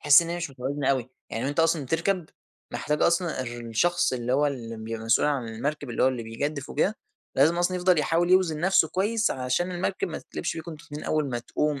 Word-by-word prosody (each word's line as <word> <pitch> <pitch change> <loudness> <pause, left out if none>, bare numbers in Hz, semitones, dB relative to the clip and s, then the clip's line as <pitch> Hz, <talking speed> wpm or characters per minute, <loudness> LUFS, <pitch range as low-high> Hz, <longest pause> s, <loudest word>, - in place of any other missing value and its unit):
تحس 145 +2 +7
إن 165 - -5
هي 170 - -2
مش 170 -3 -4
متوازنة 135 +2 -3
أوي، 130 -2 -1 0.2
يعني 115 +3 -3
وأنتَ 145 +4 0
أصلًا 165 -2 +2
بتركب 170 +4 0 0.5
محتاج 150 0 -1
أصلًا 170 -4 +2
الر 120 -1 -6
الشخص 130 +9 +1
اللي 125 0 -1
هو 145 +3 +3
ال 115 -5 -4
بيبقى 115 0 -5
مسؤول 115 +5 +3
عن 135 -5 -1
المركب 140 +5 -3
اللي 115 - 0
هو 130 - +5
بيجدِّف 130 +4 -4
وكده، 195 +8 +1 0.4
لازم 155 +5 +5
أصلًا 180 +1 +1
يفضل 180 -1 +3
يحاول 165 +3 +2
يوزن 180 -5 +3
نفسه 180 -3 +4
كويس، 210 +5 +1
علشان 130 +8 -1
المركب 180 +2 -1
ما 160 - -5
تتقلبش - - -4
بيكم 165 +1 -6
أنتم 155 -1 -10
الاتنين 150 -2 -8
أول 155 -3 0
ما 120 - -1
تقوم 145 +4 -1
150 Hz, 215 wpm, -26 LUFS, 130-170 Hz, 0.5 s, تحس